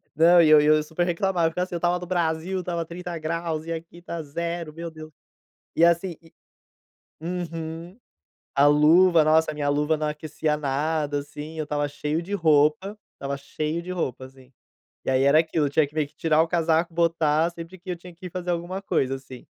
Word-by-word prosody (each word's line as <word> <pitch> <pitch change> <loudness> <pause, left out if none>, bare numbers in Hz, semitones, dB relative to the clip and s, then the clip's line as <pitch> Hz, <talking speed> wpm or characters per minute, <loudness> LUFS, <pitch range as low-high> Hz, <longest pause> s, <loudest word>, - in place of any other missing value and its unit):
Não 170 +2 +6
e 160 - +5
eu 155 -1 +8
e 150 - +1
eu 155 0 +5
super 160 +3 -2
reclamava 175 -1 +1
eu 165 - -2
ficava 180 +2 -1
assim 180 - -7
eu - - 0
estava 175 +1 +1
no 180 - -8
Brasil, 175 +1 -1
estava 170 -2 -3
30 175 0 -6
graus 160 0 -3
e 165 - -3
aqui 165 +1 -8
está 170 -1 -6
0, 170 +1 -4
meu 170 +1 -6
Deus. 155 -1 -11 0.6
E 170 - +5
assim 170 0 +1
e, 165 - -21 0.9
uhum, 170 +2 -5 0.6
a 140 +1 +5
luva 160 +4 +6
nossa, 155 +1 +3
a 155 - -7
minha 145 -1 -2
luva 150 +2 +1
não 155 0 -2
aquecia 150 0 -2
nada 145 +1 -1
assim, 150 +2 -8
eu 155 - -1
estava 145 0 -1
cheio 150 +3 -3
de 195 +4 -8
roupa, 160 +3 +2 0.2
estava 140 0 -4
cheio 155 +4 -4
de 180 - -8
roupa 135 -8 -3
assim. 130 -1 -16 0.6
E - - +1
aí 130 0 +2
era 140 +3 +5
aquilo, 160 -2 +1
eu - - -3
tinha 150 +1 +3
que 145 - -19
meio 155 -2 0
que - - -32
tirar 160 -1 +3
o 165 - -2
casaco, 165 0 +1
botar, 165 -1 +2
sempre 170 +2 -10
que 180 +1 -9
eu 175 - -2
tinha 175 0 -13
que 180 +2 -10
ir - - -7
fazer 180 0 -4
alguma 175 +3 -3
coisa, 135 -8 0
assim. 130 -2 -12
160 Hz, 215 wpm, -25 LUFS, 150-170 Hz, 0.9 s, eu